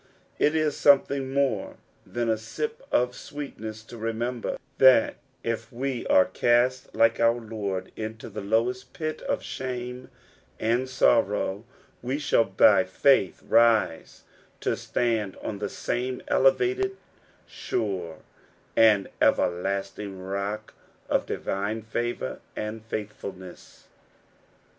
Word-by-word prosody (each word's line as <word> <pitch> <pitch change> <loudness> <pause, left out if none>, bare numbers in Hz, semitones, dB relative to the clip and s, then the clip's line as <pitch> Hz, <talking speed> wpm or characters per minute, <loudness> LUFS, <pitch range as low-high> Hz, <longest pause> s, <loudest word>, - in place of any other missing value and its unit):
It 150 +2 +3
is 155 -2 +1
something 140 -1 +3
more 140 0 0 0.3
than 120 -1 -2
a 110 - +3
"sip 455 - -5
of 125 0 +2
sweetness" 110 -7 -7
to 115 +1 -11
remember 115 +2 -2 0.2
that 130 -4 +6 0.3
if 115 0 -3
we 130 0 -3
are 95 - +6
cast 125 +2 +1
like 115 0 +4
our 115 +1 +3
Lord 100 -5 -4
into 110 0 -6
the - - -6
lowest 120 +5 0
pit 155 -1 -4
of - - -2
shame 125 -1 -5 0.5
and 120 +4 +1
sorrow, 105 -4 +2 0.4
we 130 +3 -2
shall 145 -6 +3
by 95 -1 +5
faith 95 +2 +2
rise 110 -7 +3 0.4
to - - 0
stand 110 -5 -1
on 100 - -5
the 105 -1 -2
same 125 +1 -3
elevated, 385 - +2 0.5
sure, 90 -7 -3 0.5
and 110 -3 +5
everlasting 95 +1 0
lock 100 +2 -3 0.4
of - - +1
divine 105 +3 -2
favour 120 - -3 0.2
and 105 +1 -5
faithfulness. 100 -4 -8
115 Hz, 115 wpm, -26 LUFS, 105-130 Hz, 0.5 s, that